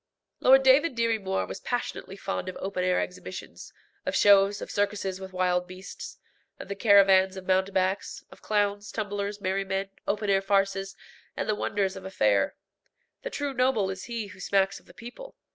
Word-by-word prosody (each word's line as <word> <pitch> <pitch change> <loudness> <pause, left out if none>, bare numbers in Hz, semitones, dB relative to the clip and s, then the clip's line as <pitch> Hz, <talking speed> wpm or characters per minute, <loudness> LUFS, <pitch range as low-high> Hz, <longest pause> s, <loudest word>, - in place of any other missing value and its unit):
Lord 270 +1 +6
David 270 +2 +5
Dirry 230 -1 +1
Moir 190 -1 -1
was - - -7
passionately 240 -5 -4
fond 195 -1 -3
of 185 - -7
open 190 -1 -3
air 180 0 +2
exhibitions, 185 +1 -7 0.3
of - - -2
shows, 200 0 +5
of - - -7
circuses 200 -2 -1
with 190 0 -8
wild 180 -1 0
beasts, 185 +1 -9 0.4
of - - -10
the 200 - -3
caravans 195 -2 +5
of 185 - -8
mountebanks, 190 +1 0
of - - -15
clowns, 205 -1 0
tumblers, 205 -1 -3
merrymen, 195 0 -2 0.2
open 210 +1 -1
air 195 0 +3
farces, 195 0 0 0.4
and 190 - -2
the 215 - +2
wonders 200 -2 -1
of 190 - -9
a - - -6
fair. 105 - +2 0.7
The - - -5
true 285 - -3
noble 250 -6 +1
is 190 0 -7
he 235 -2 -4
who 200 -1 -13
smacks 195 +1 +1
of - - -27
the - - -16
people. 250 - -10
195 Hz, 180 wpm, -27 LUFS, 190-210 Hz, 0.7 s, Lord